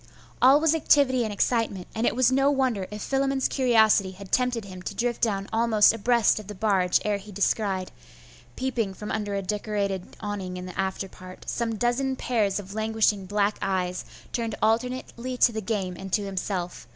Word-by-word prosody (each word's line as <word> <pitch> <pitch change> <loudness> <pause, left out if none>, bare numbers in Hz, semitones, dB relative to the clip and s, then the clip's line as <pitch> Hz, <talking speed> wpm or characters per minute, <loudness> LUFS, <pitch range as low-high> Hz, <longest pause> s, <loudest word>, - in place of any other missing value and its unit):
All 265 +3 +7
was 320 0 +3
activity 280 -5 +3
and 220 - -3
excitement; 205 -3 0
and 225 +2 0
it - - +1
was 255 0 +4
no 270 +2 +3
wonder 255 -9 0
if 210 0 -6
Philammon's 270 0 +1
curiosity 220 -6 +3
had 190 0 -12
tempted 250 -3 +1
him 185 -2 -9
to 200 - -6
drift 240 +2 -1
down 200 -3 0
almost 225 -2 +5
abreast 230 0 +2
of 210 - -10
the 210 - -7
barge 190 -3 +2
ere 210 -1 +1
he 205 +1 -12
descried, 195 -1 0 0.6
peeping 235 -7 -2
from 210 - -6
under 205 -2 -2
a 195 - -2
decorated 200 -2 -3
awning 195 -3 -4
in 180 - -6
the 180 - -8
afterpart, 190 -1 -5
some 230 -1 -2
dozen 245 +4 0
pairs 215 -7 0
of 195 -1 -9
languishing 220 -2 +1
black 205 +1 0
eyes, 185 -2 -1 0.3
turned 230 -2 -2
alternately 250 +2 -1
to 245 - +5
the 220 -1 -4
game 195 -4 -2
and 190 +1 -8
to 210 - +2
himself. 185 - -4
210 Hz, 180 wpm, -26 LUFS, 195-240 Hz, 0.6 s, All